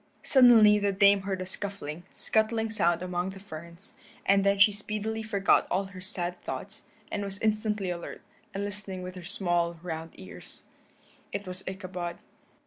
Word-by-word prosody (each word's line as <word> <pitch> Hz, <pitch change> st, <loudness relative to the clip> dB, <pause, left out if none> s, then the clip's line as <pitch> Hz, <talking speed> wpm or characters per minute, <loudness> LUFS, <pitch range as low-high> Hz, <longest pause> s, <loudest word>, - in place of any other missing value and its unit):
Suddenly 230 Hz, -5 st, +7 dB
the 200 Hz, -1 st, +1 dB
Dame 200 Hz, 0 st, +5 dB
heard 190 Hz, -1 st, -3 dB
a -, -, -3 dB
scuffling, 185 Hz, -5 st, -3 dB
scuttling 220 Hz, 0 st, +1 dB
sound 175 Hz, -4 st, +1 dB
among 180 Hz, 0 st, -2 dB
the 195 Hz, 0 st, -9 dB
ferns, 170 Hz, 0 st, -9 dB, 0.3 s
and 195 Hz, 0 st, +4 dB
then 200 Hz, 0 st, +3 dB
she 200 Hz, +2 st, +7 dB
speedily 215 Hz, +2 st, -3 dB
forgot 200 Hz, -3 st, +2 dB
all 190 Hz, +2 st, +1 dB
her 190 Hz, -1 st, -10 dB
sad 180 Hz, -2 st, -1 dB
thoughts, -, -, -7 dB, 0.3 s
and 205 Hz, -, -2 dB
was 195 Hz, -1 st, -5 dB
instantly 210 Hz, -3 st, 0 dB
alert, 170 Hz, -1 st, -7 dB, 0.3 s
and 200 Hz, +1 st, -3 dB
listening 200 Hz, -2 st, -3 dB
with 180 Hz, 0 st, -6 dB
her 180 Hz, -1 st, -9 dB
small 175 Hz, -2 st, 0 dB
round 165 Hz, -2 st, -5 dB
ears. 95 Hz, -, -9 dB, 0.7 s
It 200 Hz, 0 st, -4 dB
was 185 Hz, +1 st, -6 dB
Ichabod. 185 Hz, -2 st, -5 dB
195 Hz, 160 wpm, -28 LUFS, 180-205 Hz, 0.7 s, Suddenly